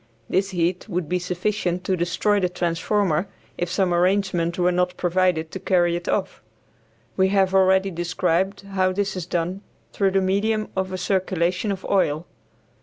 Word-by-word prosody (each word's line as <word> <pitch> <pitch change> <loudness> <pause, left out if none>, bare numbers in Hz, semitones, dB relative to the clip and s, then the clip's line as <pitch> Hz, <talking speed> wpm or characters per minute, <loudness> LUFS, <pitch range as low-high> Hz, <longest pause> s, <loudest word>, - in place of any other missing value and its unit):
This 195 +1 +1
heat 180 +2 -1
would 180 -4 -2
be 180 +2 0
sufficient 180 0 -2
to 190 - 0
destroy 180 +4 +1
the 180 -2 +1
transformer 180 0 0 0.3
if 175 - -2
some 180 0 +1
arrangement 180 -1 +1
were 180 0 +3
not 180 0 0
provided 175 -2 +1
to 190 - -5
carry 175 -2 +2
it 175 0 -4
off. 195 - -1 0.8
We 190 0 +4
have 190 -1 +2
already 190 0 +4
described 175 +2 0
how 185 -1 +1
this 200 0 -1
is 180 -2 -5
done 180 +2 -2 0.3
through 195 -1 +2
the 195 0 +2
medium 210 +3 0
of 190 0 -1
a 185 - -3
circulation 185 +1 0
of 190 -1 -5
oil. 165 -5 +1
185 Hz, 165 wpm, -23 LUFS, 175-195 Hz, 0.8 s, We